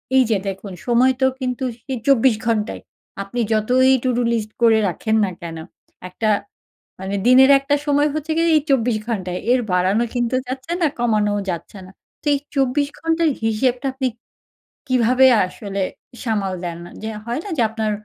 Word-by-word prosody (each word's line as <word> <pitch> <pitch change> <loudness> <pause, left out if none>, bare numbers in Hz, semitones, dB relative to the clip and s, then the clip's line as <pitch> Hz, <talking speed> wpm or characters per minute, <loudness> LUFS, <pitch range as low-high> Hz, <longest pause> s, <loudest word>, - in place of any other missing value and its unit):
এই 260 - +6
যে 210 - +3
দেখুন, 195 +1 -5 0.2
সময় 245 +2 +4
তো - - +5
কিন্তু 255 0 -3 0.2
সেই 265 -2 -4
২৪ 265 -3 +4
ঘন্টাই। 220 -2 -1 0.4
আপনি 200 +5 -6
যতই 250 +5 +3
টু-ডু 245 -1 +1
লিস্ট 215 -2 -2
করে 225 -1 +5
রাখেন 220 +5 -1
না 185 - -4
কেন, 165 -1 -6 0.5
একটা 215 +4 -2 0.7
মানে 190 +1 -3
দিনের 260 +2 +7
একটা 275 +1 0
সময় 290 +1 +3
হচ্ছে 310 +1 -4
গিয়ে, 335 +1 +2
এই 300 - +3
২৪ 245 -4 +2
ঘন্টা, 195 -6 -3 0.2
এর 255 - +3
বাড়ানো 190 +5 +2
কিন্তু 240 0 -1
যাচ্ছে 260 +6 -5
না, - - +5
কমানোও 210 -3 +1
যাচ্ছে 175 +3 -6
না। - - -14 0.3
তো - - -25
এই - - 0 0.2
২৪ 275 +1 +1
ঘন্টার 325 0 +1 0.2
হিসেবটা, 245 +4 0
আপনি 265 0 -2 0.8
কীভাবে 255 +1 +4 0.2
আসলে 200 +1 -5 0.4
সামাল 205 -5 -1
দেন? 170 -1 -5 0.2
যে 220 - -3 0.2
হয় 240 +4 -2
না - - -6
যে, - - +2
আপনার 220 -1 -2
240 Hz, 165 wpm, -20 LUFS, 210-265 Hz, 0.8 s, দিনের